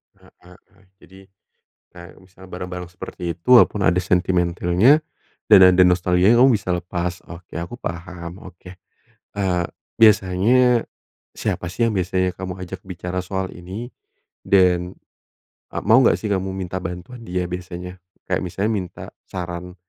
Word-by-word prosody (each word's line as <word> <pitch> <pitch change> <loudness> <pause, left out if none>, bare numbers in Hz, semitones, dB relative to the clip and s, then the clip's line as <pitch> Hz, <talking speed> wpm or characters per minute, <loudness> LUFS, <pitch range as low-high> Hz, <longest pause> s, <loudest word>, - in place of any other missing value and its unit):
Heeh - - -22
heeh. 95 +2 -20 0.2
Jadi 95 +1 -16 0.8
kayak 85 0 -12
misalnya 95 0 -17
barang-barang 90 0 -6
seperti 90 - -10 0.2
itu 85 - -18
walaupun 105 - +1
ada 90 0 +3
sentimentilnya 90 - +2 0.5
dan - - +8
ada 90 - +5
nostalgianya 90 +4 +3
kamu 135 - +6
bisa 90 -2 -2
lepas. 90 0 -4
Oke, 85 0 -11
aku 85 +9 -6
paham, 85 +2 -7
oke. 90 0 -12 0.6
Eee, 95 -3 0 0.4
biasanya 110 +4 +4 0.5
siapa - - -3
sih 115 +5 +1
yang 110 - -3
biasanya 95 0 0
kamu 90 -1 -6
ajak 90 +1 -8
bicara 90 0 -5
soal 95 0 -3
ini 95 +7 -8 0.6
dan, 90 -2 +3 0.8
eee, - - -3
mau 110 +4 +6
enggak - - +4
sih, 110 - -3
kamu 95 0 -1
minta 95 -1 -4
bantuan 90 +7 -7
dia 90 0 -2
biasanya? 90 0 -7 0.3
Kayak - - -1
misalnya 95 +5 -2
minta 95 -5 -5 0.2
saran, 90 0 -6
90 Hz, 140 wpm, -21 LUFS, 90-95 Hz, 0.8 s, dan